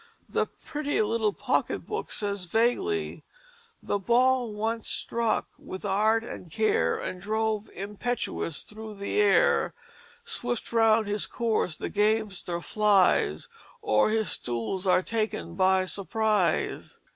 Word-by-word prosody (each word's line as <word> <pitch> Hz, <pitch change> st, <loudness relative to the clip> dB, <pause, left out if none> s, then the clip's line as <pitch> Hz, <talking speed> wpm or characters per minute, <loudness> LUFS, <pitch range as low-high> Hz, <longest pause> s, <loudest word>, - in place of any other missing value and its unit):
The -, -, 0 dB
Pretty 295 Hz, -1 st, -3 dB
Little 220 Hz, 0 st, +1 dB
Pocket -, -, -1 dB
Book 435 Hz, +2 st, -4 dB
says 200 Hz, -3 st, -2 dB
vaguely: 245 Hz, -, 0 dB, 0.6 s
"The 205 Hz, -, -1 dB
ball 245 Hz, +3 st, +3 dB
once 220 Hz, +2 st, -2 dB
struck 230 Hz, -1 st, 0 dB
with 185 Hz, +2 st, -8 dB
Art 215 Hz, +3 st, +2 dB
and 180 Hz, -6 st, -8 dB
Care 220 Hz, +4 st, +2 dB
And 180 Hz, -, -5 dB
drove 220 Hz, +1 st, -1 dB
impetuous 205 Hz, -4 st, -3 dB
through 215 Hz, 0 st, -9 dB
the 200 Hz, -, -2 dB
Air, 475 Hz, +3 st, +3 dB, 0.5 s
Swift 245 Hz, -, -3 dB
round 225 Hz, -1 st, +4 dB
his 205 Hz, 0 st, 0 dB
Course 220 Hz, -8 st, -1 dB
the -, -, -4 dB
Gamester 205 Hz, -4 st, 0 dB
flies 205 Hz, -1 st, +2 dB, 0.4 s
Or 420 Hz, -, +3 dB
his 220 Hz, -2 st, 0 dB
Stools 120 Hz, -, -3 dB
are 185 Hz, 0 st, +4 dB
taken 215 Hz, -6 st, -2 dB
by 190 Hz, +1 st, +3 dB
surprise." 205 Hz, -1 st, 0 dB
215 Hz, 120 wpm, -27 LUFS, 200-230 Hz, 0.6 s, round